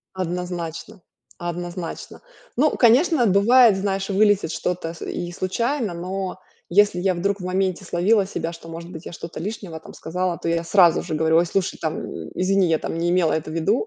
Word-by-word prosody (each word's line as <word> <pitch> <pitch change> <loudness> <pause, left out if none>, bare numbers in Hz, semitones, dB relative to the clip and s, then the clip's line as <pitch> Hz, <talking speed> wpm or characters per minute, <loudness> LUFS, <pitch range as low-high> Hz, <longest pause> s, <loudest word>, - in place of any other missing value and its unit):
Однозначно, 180 +1 -4 0.4
однозначно. 175 0 -6 0.3
Ну, 300 +4 +3
конечно, 260 - +4
бывает, 215 +3 +6
знаешь, 195 0 -2
вылетит 200 -3 +3
что-то 170 -3 -3
с 170 - -14
и 175 -1 -4
случайно, 230 +4 -1
но 185 +2 -4 0.3
если 200 0 +4
я 190 +1 +1
вдруг 200 +3 -1
в - - -7
моменте 185 0 -1
словила 190 +4 +2
себя, 170 -3 -4
что, 165 0 -11
может 165 +1 -8
быть, 165 -2 -9
я - - -7
что-то 165 -1 -7
лишнего 195 -3 -5
там - - -12
сказала, 175 +1 -2
то 170 - -5
я 170 0 0
сразу 175 -1 +4
же - - -3
говорю: 160 +1 +2
"Ой, 170 - +5
слушай, 185 +1 -1
там 160 -1 -2 0.3
извини, 190 +1 +2
я 165 -1 +2
там 165 - -4
не 170 +1 0
имела 175 -3 +2
это 160 0 -2
в - - -6
виду". 195 - +1
180 Hz, 185 wpm, -22 LUFS, 170-200 Hz, 0.4 s, бывает